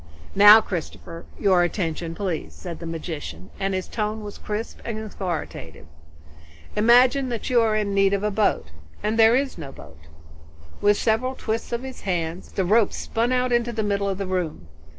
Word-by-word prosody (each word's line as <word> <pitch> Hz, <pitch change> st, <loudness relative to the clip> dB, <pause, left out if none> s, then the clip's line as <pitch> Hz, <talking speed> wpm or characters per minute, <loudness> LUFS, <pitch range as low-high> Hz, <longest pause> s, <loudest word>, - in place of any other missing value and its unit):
"Now 205 Hz, +2 st, +9 dB
Christopher, 170 Hz, -3 st, -6 dB
your 190 Hz, -4 st, +4 dB
attention 165 Hz, -2 st, -2 dB
please," 185 Hz, -5 st, -4 dB
said 175 Hz, -3 st, -8 dB
the 170 Hz, -, -7 dB
magician, 150 Hz, -, -6 dB
and 195 Hz, 0 st, -1 dB
his 185 Hz, -, -3 dB
tone 215 Hz, 0 st, -3 dB
was 205 Hz, -1 st, -8 dB
crisp 210 Hz, +2 st, -5 dB
and 230 Hz, -2 st, -4 dB
authoritative. 180 Hz, -, -6 dB, 0.9 s
"Imagine 245 Hz, +5 st, +4 dB
that 235 Hz, +2 st, -4 dB
you 240 Hz, -2 st, +5 dB
are 220 Hz, -1 st, +2 dB
in 210 Hz, -2 st, -1 dB
need 195 Hz, 0 st, +3 dB
of 200 Hz, 0 st, 0 dB
a 210 Hz, -, 0 dB
boat, 200 Hz, -, 0 dB, 0.3 s
and 215 Hz, +2 st, 0 dB
there 225 Hz, +1 st, +7 dB
is 265 Hz, -7 st, -1 dB
no 140 Hz, -4 st, -7 dB
boat." 80 Hz, -, -14 dB, 0.8 s
With 205 Hz, 0 st, +4 dB
several 250 Hz, +4 st, 0 dB
twists 225 Hz, -1 st, -3 dB
of 235 Hz, +1 st, -2 dB
his 265 Hz, -1 st, -8 dB
hands 175 Hz, -2 st, -3 dB
the 190 Hz, -, 0 dB
rope 215 Hz, +3 st, +3 dB
spun 235 Hz, +2 st, -1 dB
out 250 Hz, 0 st, +1 dB
into 240 Hz, 0 st, +1 dB
the 220 Hz, -2 st, -2 dB
middle 200 Hz, -1 st, 0 dB
air 195 Hz, -, 0 dB
of -, -, -8 dB
the 195 Hz, -, -3 dB
room. 180 Hz, -, -3 dB
205 Hz, 185 wpm, -23 LUFS, 175-225 Hz, 0.9 s, Now